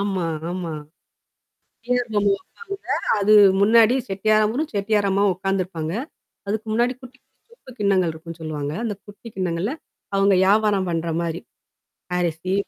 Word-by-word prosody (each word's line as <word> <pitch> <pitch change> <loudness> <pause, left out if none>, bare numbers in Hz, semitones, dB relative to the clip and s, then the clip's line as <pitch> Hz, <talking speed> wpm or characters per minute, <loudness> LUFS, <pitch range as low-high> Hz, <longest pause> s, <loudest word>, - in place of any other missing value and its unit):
ஆமா, 195 -3 -1 0.3
ஆமா. 175 -2 -4 1.1
செட்டியார் 245 -1 0
பொம்மை 205 -1 +3
வைப்பாங்க. 400 - -10 0.3
அது 205 +1 +4 0.3
முன்னாடி 230 +3 +5
செட்டியாரவரும், 215 +8 +1
செட்டியார் 205 0 +1
அம்மாவும் 195 0 +2
உட்காந்துருப்பாங்க. 185 -4 -2 0.5
அதுக்கு 215 +2 -2
முன்னாடி 240 +2 +2
குட்டி, 255 +1 -13
குட்டி 470 - -29
சொப்பு 260 - -15
கிண்ணங்கள் 190 -4 +2
இருக்குன்னு 165 +1 -10
சொல்லுவாங்க, 150 -2 -4
அந்த 215 -4 -2
குட்டி 205 +3 -13
கிண்ணங்கள்ல 185 - -1 0.4
அவங்க 195 0 +4
வியாபாரம் 200 -1 +3
பண்ணுற 165 0 -1
மாரி. 170 0 -3 0.8
அரிசி, 175 +1 -1
200 Hz, 130 wpm, -22 LUFS, 175-220 Hz, 1.1 s, முன்னாடி